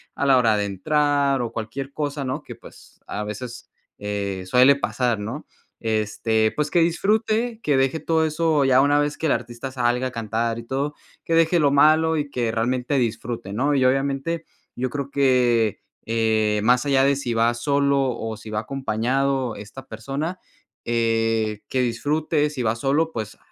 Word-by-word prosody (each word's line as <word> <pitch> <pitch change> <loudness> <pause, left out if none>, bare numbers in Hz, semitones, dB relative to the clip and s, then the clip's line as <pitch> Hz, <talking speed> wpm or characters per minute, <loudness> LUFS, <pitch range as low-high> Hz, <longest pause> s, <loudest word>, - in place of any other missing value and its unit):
a - - -1
la 135 -2 +5
hora 115 -3 +3
de 105 - 0
entrar 140 +6 +1
o 120 - -3
cualquier 115 +5 -5
cosa, 145 -1 -3
¿no?, 130 0 -3
que - - -10
pues - - -17
a 105 +1 -4
veces, 120 +3 -7 0.3
eh, 100 -2 -3
suele 125 +7 +6
pasar, 125 -5 -1
¿no?, 115 +9 -6 0.3
este, 110 0 0
pues 150 0 -1
que 175 - +2
disfrute, 215 +7 +1
que 145 - +2
deje 135 +4 +1
todo 160 0 +1
eso 155 -2 +1
ya 130 0 +5
una 145 +1 +3
vez 145 0 -1
que - - -4
el - - +2
artista 120 +2 -3
salga 125 0 0
a - - -6
cantar 115 0 -2
y - - -8
todo, 135 +5 -2 0.3
que 165 - -2
deje 165 +1 +4
lo 145 -3 +3
malo 155 +3 +4
y 145 -1 -2
que 120 -4 -1
realmente 125 +4 0
disfrute, 115 -4 -3
¿no?, 140 +7 +1
y 130 -2 +3
obviamente, 135 +5 0 0.3
yo 130 +1 -2
creo 140 +1 -4
que, 125 -6 +2 0.3
eh, 110 -2 +1
más 125 +2 +4
allá 135 -1 +4
de 140 +1 +3
si 130 -3 -3
va 115 +1 +3
solo 140 +3 +1 0.2
o 110 0 -4
si 110 +1 -11
va 105 0 -2
acompañado 130 0 -1
esta 105 +6 -10
persona, 140 +11 -4 0.4
eh, 115 -2 0
que 130 - 0
disfrute 150 +5 0
si 140 -4 -4
va 110 0 +1
solo, 140 +7 0
pues 110 -6 -6
130 Hz, 180 wpm, -23 LUFS, 115-145 Hz, 0.4 s, suele